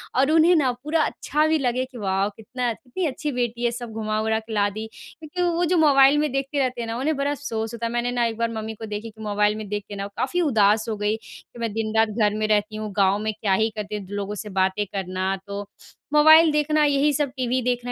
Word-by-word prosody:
और 270 +4 +3
उन्हें 325 +2 +5
ना 275 -6 +3
पूरा 310 +2 +1
अच्छा 300 +2 0
भी 315 0 +3
लगे 255 -2 0
कि, 260 -1 -13
"वाउ! 195 -1 0
कितना 240 +2 -3
कितनी 260 +10 -5
अच्छी 295 +2 -3
बेटी 240 -1 -2
है, 240 - +2
सब 240 -1 -7
घुमा-वरा 220 0 -1
के 220 0 -9
ला 205 -1 +2
दी।" 215 +2 -6
क्योंकि 320 +3 -8
वो 350 +1 +1
जो 365 - +4
मोबाइल 280 -2 +6
में 300 -2 +1
देखते 275 +1 -2
रहते 255 -3 -1
हैं 230 - -4
ना, 225 - -3
उन्हें 300 +5 0
बड़ा 280 +1 0
अफ़सोस 225 -6 -4
होता 235 0 -4
है। 230 - -2
मैंने 240 +1 0
ना 240 -1 +1
एक 230 -1 -2
बार 230 0 0
मम्मी 220 0 -5
को 220 - -8
देखी 210 +1 -5
कि 220 0 -15
मोबाइल 210 0 +1
में 215 -1 -6
देख 205 0 -3
के 205 - -6
ना 200 0 -4
काफ़ी 355 +7 0
उदास 215 0 +3
हो 215 - -2
गई 210 +1 0
कि, 230 +1 -15
"मैं 230 -2 -2
दिन-रात 220 0 +1
घर 210 -1 +1
में 215 0 0
रहती 215 0 +1
हूँ, 215 -1 -5
गाँव 195 0 +3
में 215 0 -1
क्या 205 -2 -1
ही 220 +3 +2
करती 210 0 -4
हूँ?" 200 - -8
द - - -14
लोगों 200 +1 -4
से - - -7
बातें 190 +2 +1
करना, 190 -1 -2
तो 200 0 -5 0.5
मोबाइल 315 +2 +7
देखना, 300 +1 +2
यही 285 +1 +3
सब, 285 0 0
टीवी 255 0 0
देखना, 245 0 -1
230 Hz, 250 wpm, -23 LUFS, 210-275 Hz, 0.5 s, मोबाइल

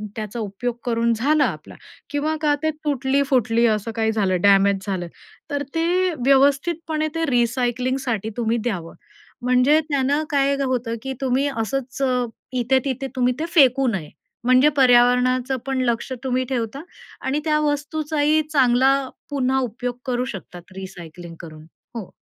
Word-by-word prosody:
त्याचा 220 +1 -5
उपयोग 220 +3 -3
करून 235 -1 +1
झाला 285 +6 +2
आपला - - -6 0.3
किंवा 295 +2 -1
का 295 -2 +3
ते 315 - +2 0.2
तुटली-फुटली 265 -4 +1
असं 215 +1 -1
काही 220 0 +1
झालं 190 -5 0
डॅमेज 200 0 +4
झालं, 180 -3 -2 0.4
तर 285 0 -1
ते 355 +2 +1
व्यवस्थितपणे 305 +4 +2
ते 330 - 0
रिसायकलिंगसाठी 245 -1 0
तुम्ही 230 0 0
द्यावं. 195 -8 -4 0.5
म्हणजे 255 +5 +4
त्यानं 285 +2 +1
काय 280 -1 +2
होतं 245 -3 -1
की 265 0 -4
तुम्ही 265 +2 +1
असच 265 +1 -3
अ, 250 -2 +1 0.3
इथे-तिथे 260 +2 0
तुम्ही 250 0 +2
ते 320 - -1
फेकू 270 -3 +5
नये. 185 -10 -2 0.3
म्हणजे 255 +4 +5
पर्यावरणाचं 250 0 +4
पण 265 -1 -1
लक्ष 235 +2 -1
तुम्ही 255 0 0
ठेवता 250 +1 -3 0.4
आणि 270 +3 -1
त्या 305 -1 +2
वस्तूचाही 300 +1 0
चांगला 260 -1 +4 0.4
पुन्हा 265 -2 0
उपयोग 245 0 -4
करू 250 -1 -1
शकतात 180 -6 -9
रिसायकलिंग 175 -3 -9
करून. 155 -2 -11 0.3
हो. 215 -6 -6
255 Hz, 140 wpm, -22 LUFS, 230-280 Hz, 0.5 s, फेकू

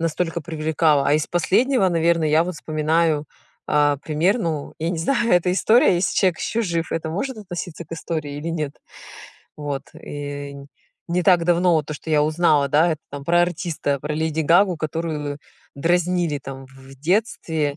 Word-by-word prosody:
настолько 165 +1 -1
привлекало. 155 -2 +1
А 145 - +3
из 155 - +1
последнего, 215 +4 +2
наверное, 165 -2 +2
я 155 +2 +4
вот 180 0 -4
вспоминаю, 155 0 0 0.4
а, 145 -2 +3
пример, 160 +10 +1
ну, 160 -7 -3
я 165 +2 0
не 170 - -3
знаю, 235 +5 +1
это 180 0 +3
история, 220 +2 +4
если 175 +2 0
человек 185 -4 +2
ещё 230 +1 -1
жив, 170 -4 -2
это 165 -1 -2
может 260 +9 -3
относиться 175 -4 -6
к 165 - -12
истории 155 -3 -4
или 165 +3 -5
нет. 155 -4 -2 0.8
Вот, 145 -2 -4
и 145 -1 -6
н 140 0 -11 0.4
не 175 +1 0
так 175 -2 +4
давно 175 0 +3
вот 155 -2 +1
то, 155 - -5
что 160 - -8
я 150 -1 +4
узнала, 155 -2 +2
да, 155 +5 +3
это 155 - -6
там 140 0 -7
про 175 +2 +3
артиста, 170 -5 -2
про 150 +2 -3
Леди 160 0 -1
Гагу, 175 +3 +4
которую 155 -2 -3 0.4
дразнили 175 0 +1
там 135 -1 -9
в 130 - -21 0.2
в - - -12
детстве, 160 -5 0
160 Hz, 180 wpm, -22 LUFS, 150-175 Hz, 0.8 s, я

